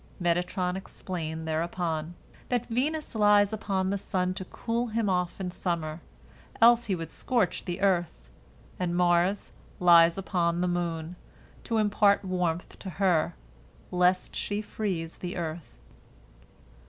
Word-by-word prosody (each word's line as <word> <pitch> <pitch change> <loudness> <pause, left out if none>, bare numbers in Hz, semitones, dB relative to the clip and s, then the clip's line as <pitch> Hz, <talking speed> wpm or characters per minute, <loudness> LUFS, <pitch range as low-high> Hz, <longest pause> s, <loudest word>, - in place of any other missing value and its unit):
Metatron 180 +1 0
explained 160 -4 -5
thereupon, 165 0 -2 0.3
that 245 -1 0
Venus 295 +7 -1
lies 205 -1 +4
upon 195 -3 -1
the 200 - -1
sun 185 -1 -1
to 190 0 -6
cool 235 +5 -2
him 225 -1 -1
off 180 -1 -1
in 185 -2 -3
summer, 165 -3 -3 0.6
else 235 +1 +6
he 195 - 0
would 165 -2 -6
scorch 230 -9 0
the 180 +1 -4
earth, 175 - 0 0.5
and 175 -1 -1
Mars 180 +2 +2 0.3
lies 170 -1 +6
upon 175 -3 0
the 180 - +1
moon, 170 -1 -2 0.5
to 230 - 0
impart 205 -1 +3
warmth 180 -2 -2
to 195 - -7
her, 175 - +1 0.6
lest 180 +1 +2
she 205 0 -2
freeze 190 -6 -3
the 180 0 -5
earth. 165 -1 -5
180 Hz, 130 wpm, -28 LUFS, 170-205 Hz, 0.6 s, else